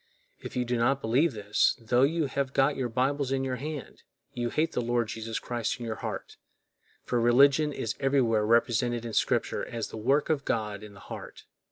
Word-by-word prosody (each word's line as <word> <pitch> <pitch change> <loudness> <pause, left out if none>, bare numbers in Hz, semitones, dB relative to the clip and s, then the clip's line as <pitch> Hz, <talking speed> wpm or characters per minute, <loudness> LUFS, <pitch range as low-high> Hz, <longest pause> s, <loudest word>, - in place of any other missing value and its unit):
If - - -8
you 125 -1 0
do 120 0 -1
not 130 +4 +2
believe 135 +6 +2
this, 105 -1 +1
tho 120 +2 +1
you 155 +3 +2
have 135 0 -2
got 140 +1 +3
your 130 -2 -2
Bibles 135 +3 0
in 135 0 0
your 130 -1 -2
hand, 145 -3 -7 0.3
you 120 -1 -2
hate 155 +6 0
the - - -1
Lord 120 -1 0
Jesus 115 0 -4
Christ 120 0 -3
in 120 - -5
your 110 -1 -4
heart; - - -6 0.7
for 120 -1 0
religion 140 +5 +5
is 115 -5 -3
everywhere 130 -6 +2
represented 120 +1 +2
in 115 - -5
Scripture - - +1
as 115 -2 -4
the - - -8
work 135 +8 +2
of 145 -3 0
God 105 -5 -2
in 105 -1 -11
the 100 - -14
heart. - - -9
120 Hz, 200 wpm, -28 LUFS, 115-135 Hz, 0.7 s, religion